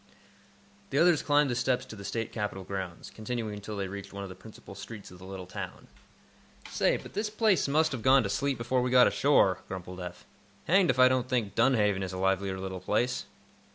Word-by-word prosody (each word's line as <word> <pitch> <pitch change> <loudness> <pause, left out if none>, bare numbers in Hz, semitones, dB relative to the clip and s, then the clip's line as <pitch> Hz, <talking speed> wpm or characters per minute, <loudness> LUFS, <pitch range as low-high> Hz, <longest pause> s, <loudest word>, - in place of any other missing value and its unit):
The 140 - -2
others 170 -1 +5
climbed 145 -2 +3
the - - -1
steps 125 0 0
to - - -10
the 100 - -10
State 115 +2 -3
Capitol 105 -3 -4
grounds, 95 -2 -6
continuing 110 -1 -4
until 105 +1 -7
they 100 -1 -2
reached 100 +1 -8
one 100 0 -6
of 100 - -7
the 95 - -9
principal 105 +1 -13
streets 105 0 -9
of 90 - -13
the 95 - -11
little 95 -1 -7
town. 90 - -8 0.8
"Say, - - +2
but - - -12
this 210 +1 -1
place 215 -6 +2
must 155 +3 +2
have 130 -4 -4
gone 130 +3 +5
to - - -2
sleep 140 0 0
before 125 +2 0
we 125 - 0
got 125 0 +7
ashore," 100 -10 +3
grumbled 90 -1 -7
Eph. 90 -1 -8 0.4
"Hanged 190 0 +4
if - - +2
I 130 0 +7
don't 130 -1 0
think 120 -6 0
Dunhaven 110 -5 +3
is 95 -1 -4
a - - -4
livelier 95 0 0
little 95 -1 -5
place!" 115 +7 0
110 Hz, 215 wpm, -29 LUFS, 95-130 Hz, 0.8 s, got